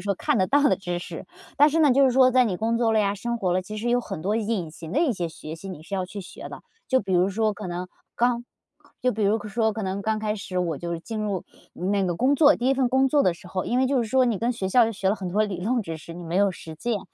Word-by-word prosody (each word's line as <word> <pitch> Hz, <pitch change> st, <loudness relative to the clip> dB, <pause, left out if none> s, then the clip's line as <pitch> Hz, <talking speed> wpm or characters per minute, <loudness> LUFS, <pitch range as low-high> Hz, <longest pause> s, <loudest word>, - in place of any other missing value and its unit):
说 200 Hz, +1 st, -1 dB
看 205 Hz, -, 0 dB
得 185 Hz, -, +3 dB
到 285 Hz, +1 st, +3 dB
的 285 Hz, -, +4 dB
知 175 Hz, -2 st, -4 dB
识。 -, -, -8 dB, 0.3 s
但 295 Hz, -, +7 dB
是 315 Hz, +2 st, 0 dB
呢， 295 Hz, -, +5 dB
就 275 Hz, +2 st, +5 dB
是 260 Hz, -, +4 dB
说 255 Hz, 0 st, +5 dB
在 255 Hz, 0 st, +4 dB
你 195 Hz, -5 st, -1 dB
工 230 Hz, +4 st, 0 dB
作 230 Hz, -2 st, +2 dB
了 220 Hz, -, +3 dB
呀， 200 Hz, -1 st, +1 dB
生 235 Hz, +4 st, -3 dB
活 185 Hz, -6 st, 0 dB
了， 185 Hz, -, +2 dB
其 210 Hz, +4 st, -8 dB
实 235 Hz, +3 st, -2 dB
有 245 Hz, 0 st, +3 dB
很 195 Hz, -8 st, -6 dB
多 200 Hz, +4 st, 0 dB
隐 215 Hz, -7 st, -1 dB
形 160 Hz, 0 st, -10 dB
的 290 Hz, -, +2 dB
一 315 Hz, -7 st, +2 dB
些 175 Hz, -4 st, -3 dB
学 155 Hz, 0 st, -8 dB
习 180 Hz, +4 st, -9 dB
你 180 Hz, -5 st, -8 dB
是 195 Hz, +5 st, -6 dB
要 185 Hz, -1 st, -1 dB
去 200 Hz, +2 st, -7 dB
学 185 Hz, -, -10 dB
的。 -, -, -10 dB, 0.3 s
就 260 Hz, -1 st, +3 dB
比 195 Hz, -2 st, -4 dB
如 180 Hz, +2 st, +3 dB
说， 215 Hz, +2 st, 0 dB
可 205 Hz, -1 st, -7 dB
能 175 Hz, +1 st, -4 dB, 0.3 s
刚 240 Hz, 0 st, +1 dB, 0.6 s
就 250 Hz, -, +3 dB
比 215 Hz, -1 st, -3 dB
如 205 Hz, +2 st, +3 dB
说 220 Hz, +1 st, +1 dB
可 220 Hz, +1 st, -5 dB
能 190 Hz, +1 st, -2 dB
刚 215 Hz, +1 st, -1 dB
开 215 Hz, 0 st, -1 dB
始 190 Hz, -2 st, -4 dB
我 165 Hz, -5 st, -2 dB
就 170 Hz, 0 st, -3 dB
进 215 Hz, +6 st, -5 dB
入 200 Hz, -4 st, -2 dB, 0.3 s
那 195 Hz, +2 st, 0 dB
个 175 Hz, -2 st, -1 dB
工 260 Hz, +10 st, +2 dB
作， 290 Hz, +1 st, +6 dB
第 245 Hz, -, -1 dB
1 270 Hz, -, +4 dB
份 260 Hz, -2 st, +1 dB
工 265 Hz, +2 st, +3 dB
作 290 Hz, +2 st, +3 dB
的 180 Hz, -, +3 dB
时 165 Hz, -, -14 dB
候， 185 Hz, -1 st, -3 dB
因 245 Hz, -, -1 dB
为 260 Hz, -, +3 dB
就 270 Hz, -2 st, +2 dB
是 230 Hz, -, -3 dB
说 260 Hz, +2 st, +4 dB
你 235 Hz, -5 st, 0 dB
跟 235 Hz, +4 st, 0 dB
学 195 Hz, -5 st, -3 dB
校 230 Hz, +2 st, +4 dB
学 190 Hz, -1 st, -1 dB
了 205 Hz, -, +1 dB
很 190 Hz, -3 st, -5 dB
多 205 Hz, +4 st, +2 dB
理 190 Hz, -4 st, -3 dB
论 235 Hz, +4 st, 0 dB
知 165 Hz, -4 st, -5 dB
识， 165 Hz, +2 st, -10 dB
你 175 Hz, -, -8 dB
没 170 Hz, +1 st, -3 dB
有 200 Hz, +1 st, +4 dB
实 160 Hz, -2 st, -10 dB
践。 225 Hz, +3 st, -2 dB
210 Hz, 325 characters per minute, -25 LUFS, 185-240 Hz, 0.6 s, 但